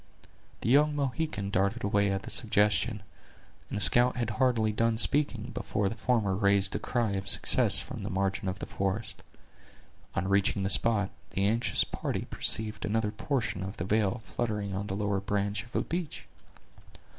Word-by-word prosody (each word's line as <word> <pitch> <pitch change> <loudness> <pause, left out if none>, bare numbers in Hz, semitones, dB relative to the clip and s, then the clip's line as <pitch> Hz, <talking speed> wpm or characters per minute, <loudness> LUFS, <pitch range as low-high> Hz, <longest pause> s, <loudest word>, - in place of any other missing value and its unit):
The - - -1
young 145 +3 +4
Mohican 140 -7 -3
darted 100 +1 0
away 100 0 +1
at 95 0 -3
the - - -7
suggestion, 105 -2 +2 0.7
and - - -4
the - - -3
scout 120 +6 +5
had 120 -3 -2
hardly 110 -2 +1
done 115 +1 0
speaking, 125 -3 +1
before 100 -2 -2
the 110 - -6
former 110 -4 0
raised 100 0 +1
a - - -1
cry 120 -4 -1
of 95 0 -4
success - - +4
from - - -7
the 100 - -5
margin 95 0 -2
of 95 +1 -3
the - - -6
forest. 100 +3 -3 0.9
On 95 - -1
reaching 100 0 +1
the 100 - 0
spot, 105 -2 +4 0.3
the 100 - +2
anxious 115 +3 +2
party - - -4
perceived 110 -1 +1
another 110 0 -1
portion 110 -3 -3
of 95 +2 -6
the 85 - -4
veil 105 +2 0
fluttering 105 -4 -3
on 100 +1 -4
the 95 - -3
lower 100 -1 -1
branch 100 +1 -2
of 120 - -17
a - - +2
beech. 170 -3 -5
105 Hz, 175 wpm, -29 LUFS, 100-115 Hz, 0.9 s, scout